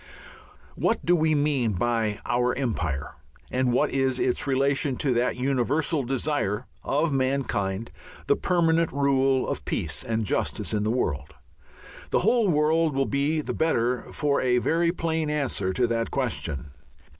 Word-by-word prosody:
What 230 - 0
do 175 - +4
we 155 -2 +2
mean 140 -7 +1
by 110 +1 0
our 125 +1 +1
Empire, 80 - -2 0.4
and 130 0 +1
what 145 +5 +2
is 135 -1 +1
its 125 +2 0
relation 140 0 +1
to 135 -3 +1
that 120 +1 +1
universal 140 +4 0
desire 130 -4 -1 0.2
of 150 +3 +1
mankind, 130 -7 -1 0.3
the 140 - +3
permanent 165 -2 +2
rule 135 -1 +2
of - - -3
peace - - -3
and 110 -1 -1
justice - - -1
in 105 - +1
the 105 - 0
world? 80 - -2 0.7
The - - +2
whole 225 +3 +3
world 155 -1 +2
will 135 0 +2
be 145 +4 0
the - - -4
better 125 -6 0
for 145 -2 0
a 125 -1 +2
very 170 +7 +2
plain 160 -3 -1
answer 135 -10 -1
to 125 +6 +1
that 115 -1 -1
question. 75 - -3
135 Hz, 150 wpm, -26 LUFS, 115-150 Hz, 0.7 s, do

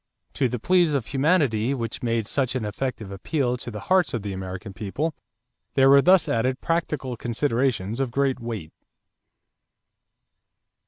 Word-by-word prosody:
To 130 -3 +1
the 125 - -2
pleas 175 +5 +3
of 135 -5 0
humanity 135 -3 +2
which 115 -3 -4
made 115 -2 0
such 130 +3 -1
an 120 -4 -1
effective 110 -1 -4
appeal 125 - -1
to 120 - -7
the 105 -3 -7
hearts 185 -7 +2
of 110 - -4
the 100 -1 -4
American 95 +2 -6
people, 115 +11 -3 0.6
there 135 0 +6
were 140 0 +8
thus 180 +1 +5
added 130 +3 0
practical 150 -6 -2
considerations 115 -3 -1
of 135 -2 0
great 135 +1 0
weight. 110 -9 -6
125 Hz, 150 wpm, -24 LUFS, 110-140 Hz, 0.6 s, were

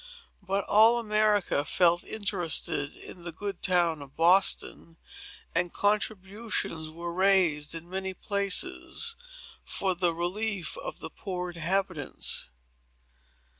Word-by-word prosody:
But 195 0 -1
all 225 +3 +6
America 215 -8 +2
felt 175 +3 +3
interested 175 -8 -2
in 180 - -11
the 175 0 -4
good 195 +2 -5
town 170 -4 +2
of 135 -1 -12
Boston; 170 -1 +2 0.6
and 175 0 0
contributions 205 -5 -1
were 170 +2 -6
raised, 175 -5 +3
in 165 +1 -8
many 190 +1 -4
places, 205 - -1 0.5
for 190 -1 -1
the 175 -1 +1
relief 190 +3 -2
of - - -7
the - - -6
poor 180 -2 -4
inhabitants. 170 - -1
185 Hz, 110 wpm, -29 LUFS, 170-205 Hz, 0.6 s, all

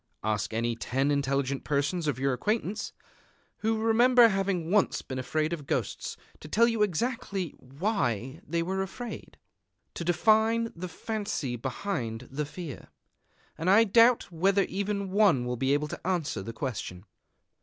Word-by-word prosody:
Ask 105 -2 -1
any 115 +1 -1
ten 135 +5 0
intelligent 140 -1 0
persons 150 +3 0
of 145 -5 0
your 135 +1 +1
acquaintance, 210 - -2 0.7
who 220 +1 0
remember 235 +2 +6
having 195 -4 -1
once 210 -1 +2
been 130 -1 -5
afraid 155 +5 -1
of 150 -5 -6
ghosts, - - -2 0.2
to - - -10
tell 230 +9 +4
you 230 -2 0
exactly 200 -2 -1
why 135 - -2
they 170 -5 -1
were 190 +2 -1
afraid, 225 +5 -7 0.6
to - - -5
define 220 +6 +3
the 180 +2 -6
fancy 205 - -3
behind 120 - -3
the 145 +2 -3
fear; 155 -2 -8 0.7
and 165 +3 0
I 205 +4 +7
doubt 230 0 +4
whether 195 +4 +3
even 200 0 -2
one 190 -11 +4
will 125 0 -2
be 130 +3 0
able 150 +1 +1
to - - -7
answer 175 - -1
the 110 +4 -6
question. 110 -7 -5
170 Hz, 150 wpm, -28 LUFS, 135-210 Hz, 0.7 s, I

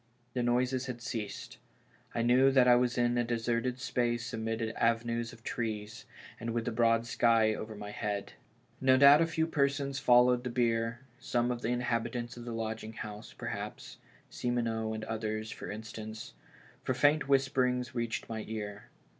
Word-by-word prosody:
The 125 - 0
noises 125 +2 +1
had 125 -2 -5
ceased; 110 -4 -5 0.6
I 115 - +1
knew 125 +3 +5
that 130 -2 +5
I 125 - +8
was 125 0 +1
in 120 0 +2
a - - +3
deserted 120 +1 -1
space 120 -2 -1
amid 115 0 -2
avenues 115 0 0
of 115 - -15
trees, 110 -3 -4 0.3
and 115 +1 -3
with 115 -1 -1
tlie 125 - -2
broad 115 0 +3
sky 115 -2 +3
over 110 0 -6
my 105 0 -7
head. 105 -1 -3 0.5
No 130 0 +5
doubt 140 +3 +8
a 165 - +3
few 160 0 0
persons 140 -2 0
followed 125 0 +5
the 125 - -3
bier, 115 -1 0 0.2
some 125 -1 0
of 120 -1 -3
the 115 - -1
inhabitants 120 -1 -1
of 120 -1 -9
the 120 - -5
lodging 110 -1 -4
house, 105 0 -8
perhaps - - -6 0.2
— - - -29
Simoneau 115 -2 -1
and 110 - -5
others, 110 0 -3
for - - -7
instance 110 0 -7 0.2
— - - -25
for 130 - -1
faint 145 +2 +3
whisperings 130 -2 +2
reached 115 -2 -2
my 110 -1 -4
ear. 105 -2 -5
120 Hz, 170 wpm, -31 LUFS, 110-125 Hz, 0.6 s, I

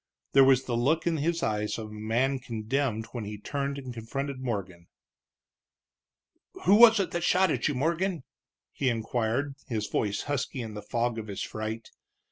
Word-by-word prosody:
There 135 - +7
was 135 -1 +5
the 120 - -2
look 145 +8 +2
in 170 -2 +1
his 165 +3 0
eyes 105 -1 -1
of 110 -2 -6
a - - -9
man 120 +6 0
condemned 115 0 -2
when 120 -3 -4
he 105 0 -6
turned 140 +5 -3
and 130 -3 -6
confronted 135 +4 -4
Morgan. 95 -9 -4 1.8
"Who 190 - +6
was 225 0 +8
it 185 -4 0
that 175 -2 -2
shot 185 0 +4
at - - 0
you, 145 - -1
Morgan?" 170 +4 0 0.5
he 135 - 0
inquired, 120 +4 -1
his 110 -4 -2
voice 100 -2 -1
husky 145 -1 -2
in 110 -1 -7
the 105 - -6
fog 115 +2 -1
of 110 - -7
his 100 -2 -4
fright. 110 +1 -5
125 Hz, 175 wpm, -28 LUFS, 110-145 Hz, 1.8 s, was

